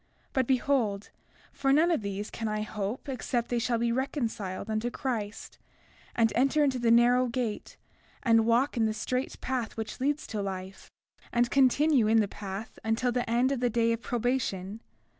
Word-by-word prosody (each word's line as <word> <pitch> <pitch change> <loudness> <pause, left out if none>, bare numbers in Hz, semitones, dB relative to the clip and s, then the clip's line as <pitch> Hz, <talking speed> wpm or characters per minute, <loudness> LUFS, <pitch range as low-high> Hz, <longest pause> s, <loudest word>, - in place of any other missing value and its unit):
But 260 -2 +1
behold, 245 -6 +1 0.4
for 270 - +1
none 320 +5 +4
of 325 - +1
these 200 +1 -4
can 225 - -4
I 215 0 -1
hope 210 +4 -4
except 245 -2 -2
they 240 - 0
shall 235 0 0
be 235 0 0
reconciled 230 -7 -2
unto 220 +2 -1
Christ, 225 -6 -4 0.6
and 225 -2 +3
enter 275 +4 +3
into 265 -3 +1
the 235 -1 +2
narrow 245 +2 +5
gate, 235 -3 -4 0.5
and 225 -3 +4
walk 245 +5 +2
in 230 -2 +2
the 215 - -2
strait 255 +4 -3
path 250 -4 -3
which 220 -1 -5
leads 290 +3 0
to 215 -2 -4
life, 190 -1 -6 0.4
and 240 0 +1
continue 275 -2 +4
in 225 +1 +4
the 210 - +2
path 200 +2 -7
until 225 +3 +1
the 245 -1 -2
end 245 +3 +2
of 275 - -1
the 245 0 +1
day 230 0 +2
of 230 - -4
probation. 230 -5 -2
235 Hz, 180 wpm, -29 LUFS, 215-255 Hz, 0.6 s, narrow